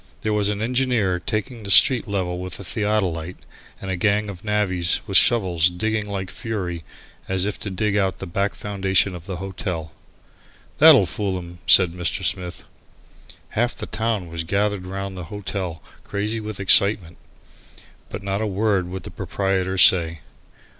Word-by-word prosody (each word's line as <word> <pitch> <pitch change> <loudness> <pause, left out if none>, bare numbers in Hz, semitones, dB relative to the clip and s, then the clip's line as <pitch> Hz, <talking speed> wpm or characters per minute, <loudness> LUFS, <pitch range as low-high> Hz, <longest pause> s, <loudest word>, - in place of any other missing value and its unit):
There 110 - -1
was 105 -1 +1
an 105 +1 -2
engineer 120 -7 +1
taking 115 +2 -4
the 100 - -8
street 125 +4 +6
level 90 -3 -2
with 90 -1 -5
a - - -7
theodolite, 95 -5 -2 0.4
and 95 - -5
a - - -1
gang 105 +3 +1
of 90 -2 -12
navvies 95 -5 +1
with 100 -3 -4
shovels 90 -9 +4
digging 110 +4 -2
like 95 -2 -4
fury 90 -7 -4 0.5
as 95 0 0
if 105 - -3
to 105 - -4
dig 100 +2 -1
out 95 -2 +1
the - - -7
back 100 +3 -2
foundations 95 -1 0
of 90 +1 -10
the 95 - -4
hotel. 90 -3 -5 0.9
"That'll - - +8
fool 100 -3 -2
'em," 85 -1 -9
said 90 -3 +7
Mr. 90 0 -2
Smith. 90 -2 -2 0.9
Half 120 +2 -1
the - - -6
town 110 -5 -2
was 80 0 -4
gathered 100 +1 -1
round 95 0 -5
the 90 -2 -7
hotel 95 -4 -5 0.2
crazy 105 +2 -3
with 110 -2 -6
excitement. 95 -2 +4 0.9
But - - -7
not 100 +1 -2
a 110 - 0
word 100 -2 0
would 95 0 -6
the - - -8
proprietor 95 -1 -2
say. 85 -4 +4
95 Hz, 165 wpm, -22 LUFS, 90-105 Hz, 0.9 s, That'll